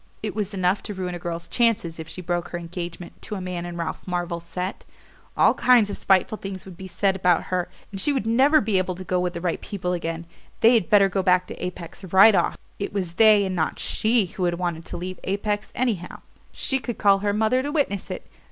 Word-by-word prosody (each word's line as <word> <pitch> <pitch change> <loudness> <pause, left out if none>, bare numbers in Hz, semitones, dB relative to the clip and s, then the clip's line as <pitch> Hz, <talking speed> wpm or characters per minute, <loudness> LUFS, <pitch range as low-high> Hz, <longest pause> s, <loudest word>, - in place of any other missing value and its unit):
It 215 - -2
was 210 -2 -3
enough 185 +1 +1
to 205 - -6
ruin 180 -1 -3
a 175 - -5
girl's 170 0 -5
chances 220 -9 +1
if 160 - -6
she 180 +2 -6
broke 175 0 -1
her 175 - -5
engagement 175 0 -7
to 210 - -5
a - - -4
man 180 -1 -4
in 175 0 -7
Ralph 170 +2 -5
Marvell's 175 -1 -3
set. 180 +3 -4 0.5
All - - +5
kinds 240 -4 +4
of - - -4
spiteful 195 +2 +2
things 195 -1 -6
would 190 -2 -10
be 190 +2 -9
said 190 +2 +1
about 180 -3 +2
her, 180 -1 0 0.2
and 195 -1 -4
she 295 - +2
would 265 -7 -1
never 265 +7 +4
be 210 -3 +1
able 185 -1 -2
to 185 - -7
go 180 0 0
with 180 -1 -1
the 170 - -5
right 175 -2 -1
people 180 -3 -3
again. 165 -1 -3 0.4
They 230 +1 +7
had 225 -7 +2
better 200 -2 +6
go 195 0 -1
back 180 0 +3
to - - -8
Apex 180 +1 -7
right 195 +4 +7
off - - +1 0.2
it 200 - -3
was 185 -4 -2
they 215 +1 +6
and 190 -1 -2
not 160 -3 -1
SHE 220 -1 +1
who 185 - 0
had 175 -1 +1
wanted 170 -2 -3
to - - -6
leave 185 +1 -6
Apex, 205 +2 -2
anyhow 220 -8 -2 0.3
she 265 - -1
could 240 -3 -5
call 200 -2 +4
her 205 +1 0
mother 220 +5 +2
to 285 +2 -3
witness 275 - -1
it. - - -6
185 Hz, 235 wpm, -24 LUFS, 175-210 Hz, 0.5 s, They